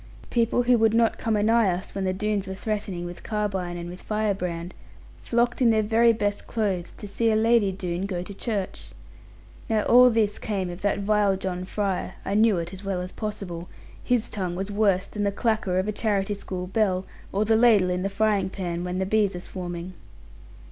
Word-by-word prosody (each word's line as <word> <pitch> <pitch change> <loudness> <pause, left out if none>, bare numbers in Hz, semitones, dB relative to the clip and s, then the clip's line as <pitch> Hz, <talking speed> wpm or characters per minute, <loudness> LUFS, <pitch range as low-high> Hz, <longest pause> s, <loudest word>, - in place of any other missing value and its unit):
People 235 +1 +2
who 245 -1 +4
would 225 0 +3
not 230 -1 +2
come 225 -1 0
anigh 220 0 +3
us, 180 +2 -3
when 195 -1 -2
the 185 - +1
Doones 200 0 -1
were 190 - -4
threatening 200 -4 -3
with 175 0 -5
carbine 195 -5 -2
and 170 0 -6
with 180 +1 -9
fire 215 -1 0
brand, 175 -2 -4 0.4
flocked 240 +2 0
in 240 - +6
their 220 -1 +3
very 230 +2 +4
best 205 -2 -2
clothes, 195 -6 -1
to 205 - -7
see 225 +3 +1
a - - +2
lady 225 -2 +3
Doone 185 0 -3
go 180 -3 -3
to 200 - -8
church. 200 -2 -4 0.8
Now 220 -2 +2
all 250 +1 +7
this 220 -3 +1
came 190 -4 -2
of 175 +2 -9
that 205 0 +1
vile 205 -1 +2
John 185 -1 -4
Fry; 195 -1 -2
I 195 - -2
knew 215 -1 +4
it 170 +2 -4
as 190 +1 -9
well 195 -2 -2
as 180 0 -6
possible; 195 -6 -5 0.3
his 245 -2 +1
tongue 185 -4 -3
was 195 +3 -3
worse 200 -3 +2
than 210 - -6
the 200 - +1
clacker 215 -3 0
of 185 +2 0
a - - +1
charity 205 -1 0
school 185 -2 -5
bell, 190 -2 0 0.3
or 205 +2 +1
the 220 +1 +3
ladle 220 -6 +5
in 180 0 -1
the 195 - -1
frying 205 -1 +1
pan, 175 -3 -4
when 180 0 -3
the 190 - 0
bees 205 -1 +2
are - - -4
swarming. 175 0 -6
200 Hz, 210 wpm, -25 LUFS, 185-220 Hz, 0.8 s, all